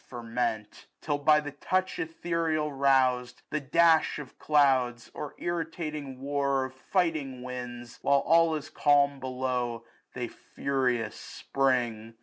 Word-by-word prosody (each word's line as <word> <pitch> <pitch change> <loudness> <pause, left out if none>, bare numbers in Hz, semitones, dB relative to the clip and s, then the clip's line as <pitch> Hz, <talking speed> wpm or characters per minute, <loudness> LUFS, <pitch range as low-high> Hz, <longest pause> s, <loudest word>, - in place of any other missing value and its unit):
Ferment; 115 -3 -3
till, 145 -2 -2
by 150 +1 +5
the 145 -1 -5
touch 185 +6 -1
ethereal 165 -2 -1
rousM, 130 -3 +2 0.2
The 155 - 0
dash 160 +3 +3
of 145 -4 -10
clouds, 130 -5 +2
or 150 - -6
irritating 155 -5 -4
war 140 -1 0
Of 130 - -8
fighting 140 -4 -1
winds, 125 -1 -7
while 140 0 +3
all 165 0 +4
is 155 0 -6
calm 140 -1 +3
below, 125 -3 -2
' - - -32
' - - -44
'5 125 - -3
Tbcy 120 - -5 0.2
furious 125 -5 0
spring. 120 -5 -1
135 Hz, 135 wpm, -28 LUFS, 125-150 Hz, 0.2 s, by